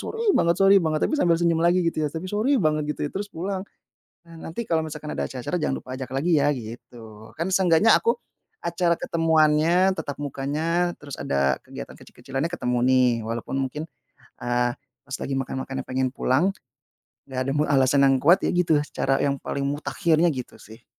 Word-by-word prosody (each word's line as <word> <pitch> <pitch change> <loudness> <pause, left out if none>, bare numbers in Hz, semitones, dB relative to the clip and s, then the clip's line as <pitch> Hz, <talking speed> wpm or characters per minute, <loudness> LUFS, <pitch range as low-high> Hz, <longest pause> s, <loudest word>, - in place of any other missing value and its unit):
sorry 455 +1 -4
banget 170 0 +3
sorry 195 +1 +6
banget," 155 -2 0
tapi - - 0
sambil 170 -1 +4
senyum 165 -1 +1
lagi 175 +1 +3
gitu 165 -1 0
ya, 150 - 0
tapi 160 +4 -6
"sorry 250 +7 +2
banget" 155 -6 +1
gitu - - -12
terus 205 +1 -4
pulang. 190 +1 -4 0.6
Nah, 170 -1 -16
"Nanti 170 +9 -4
kalau 160 -6 0
misalkan 150 -1 -7
ada - - -2
acara-acara 130 +7 -4
jangan 155 - -1
lupa 130 - -12
ajak 130 - -5
lagi 155 +4 +2
ya!" 145 +1 +2
Gitu, 110 -2 -11
kan 170 +4 -3
seenggaknya 185 +2 +5
aku 465 +1 +1 0.5
acara 175 -2 +1
ketemuannya, 165 +2 +3
tatap 145 -2 -5
mukanya 155 +6 -1
terus 145 -2 -8
ada 70 -1 0
kegiatan - - -9
kecil-kecilannya 135 +5 -5
ketemu 125 -8 -2
nih, 130 -1 +4 0.2
walaupun 115 +3 -3
mungkin, 150 +4 -4 0.5
eee, 120 0 0 0.3
pas 135 - -13
lagi 135 - -2
makan-makannya 135 0 -4
pengen 130 0 -1
pulang, 130 +6 +1 0.8
nggak 130 -1 -5
nemu 145 +2 +1
alasan 140 -1 +3
yang 135 -1 +4
kuat 175 +6 +4
ya - - +1
gitu, 175 -3 +2
secara 135 -2 0
yang 140 -1 0
paling 140 - -3
mutakhirnya, 155 +3 +1
gitu 130 -6 -5
sih. 110 +2 -15
150 Hz, 175 wpm, -24 LUFS, 130-170 Hz, 0.8 s, sorry